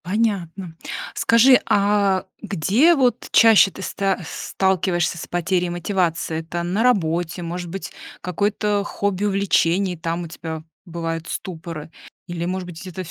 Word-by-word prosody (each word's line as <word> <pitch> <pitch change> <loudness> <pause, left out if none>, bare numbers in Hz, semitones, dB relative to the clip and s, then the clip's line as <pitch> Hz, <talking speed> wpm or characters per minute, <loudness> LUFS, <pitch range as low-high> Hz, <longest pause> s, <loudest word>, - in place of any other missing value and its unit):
Понятно. 190 -4 -1 0.4
Скажи, 250 +3 +5
а 200 -1 +2 0.2
где 210 - +3
вот 250 -4 +1
чаще 225 -3 +7
ты 195 - -10
ста 195 0 -1
сталкиваешься 180 -3 0
с - - -7
потерей 175 +1 0
мотивации? 175 -2 -1
Это 170 +1 -4
на 180 +5 -1
работе, 175 -7 +1
может 175 +1 -5
быть, 195 +3 -6 0.3
какое-то 205 +3 0
хобби, 200 -1 -2
увлечение, 195 -2 +1
там, 165 +2 -3
у - - -6
тебя 160 -1 -7 0.2
бывают 165 -1 -4
ступоры? 165 -3 -6 0.4
Или, 170 -1 -4
может 185 +1 -3
быть, 175 -2 -9
где-то 185 0 -6
в 165 - -11
180 Hz, 135 wpm, -22 LUFS, 170-200 Hz, 0.4 s, чаще